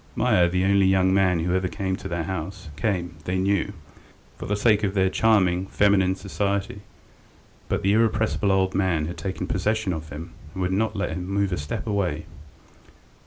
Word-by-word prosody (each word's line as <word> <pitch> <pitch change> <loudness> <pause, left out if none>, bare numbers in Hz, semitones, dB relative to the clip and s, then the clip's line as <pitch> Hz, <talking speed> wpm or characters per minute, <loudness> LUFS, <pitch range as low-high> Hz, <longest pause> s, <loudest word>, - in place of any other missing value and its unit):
Meier, 85 -1 +3
the 90 +1 +1
only 100 -1 +4
young 95 0 +3
man 90 -3 +3
who 90 +2 0
ever 95 0 +1
came 95 +2 -2
to 95 - -7
their 85 -2 -2
house, 95 0 -5
came 85 0 -1
they 90 +1 -1
knew 100 0 +1 0.6
for - - -7
the 105 - 0
sake 105 0 +3
of 100 -1 0
their 95 -1 +2
charming, 95 -5 +2
feminine 95 -2 +3
society, 100 0 -2 0.9
but 100 +1 -1
the 100 +1 +3
irrepressible 110 -2 +2
old 95 -1 +2
man 90 -5 +1
had 85 +3 -5
taken 95 -2 -3
possession 105 +1 0
of 80 -1 -6
him, 80 +4 -8 0.2
and 95 - -5
would 90 +1 0
not 110 +2 0
let 100 -4 -2
him 90 +2 -4
move 100 0 0
a 90 - -1
step 75 - -4
away. 90 -7 -1
95 Hz, 185 wpm, -24 LUFS, 90-100 Hz, 0.9 s, only